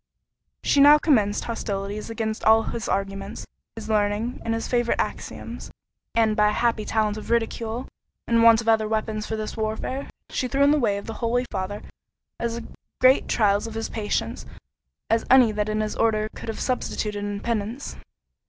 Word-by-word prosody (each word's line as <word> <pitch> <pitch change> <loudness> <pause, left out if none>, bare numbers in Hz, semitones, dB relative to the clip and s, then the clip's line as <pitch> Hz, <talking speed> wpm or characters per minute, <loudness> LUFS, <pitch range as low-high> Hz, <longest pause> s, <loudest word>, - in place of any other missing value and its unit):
She 285 - +3
now 290 +2 +9
commenced 220 -10 +2
hostilities 205 -2 -4
against 220 -1 -3
all 220 +1 +5
his 230 0 -4
arguments, 195 0 -3 0.3
his 225 - -7
learning, 215 +2 0
and 225 0 -1
his 225 - -3
favourite 240 -1 +1
axioms; - - -5 0.5
and 220 -2 +3
by 210 0 +4
a - - -1
happy 230 -2 0
talent 215 -1 0
of 215 - -8
ridicule, 230 +1 -1 0.4
in 230 0 +3
want 230 0 +7
of 225 - -10
other 220 -1 +3
weapons 215 -1 -2
for 220 - -2
this 215 -1 -4
warfare, 220 +5 -3 0.2
she 255 - -1
threw 275 +2 +2
in 285 - +5
the 300 - +3
way 205 -6 +1
of 200 - -7
the 225 - -5
holy 245 +2 +1
Father 190 +2 -4 0.6
as 235 0 -3 0.4
great 255 +1 +5
trials 205 -1 +2
of 225 - -8
his 225 0 -3
patience, 215 -2 -3 0.6
as 225 0 +2
any 255 -3 +7
that 210 0 -1
his 215 0 -1
order 215 -1 +1
could - - -8
have 220 - -4
substituted 210 -5 -2
in 205 0 -3
penance. 230 +4 -3
220 Hz, 175 wpm, -24 LUFS, 210-235 Hz, 0.6 s, now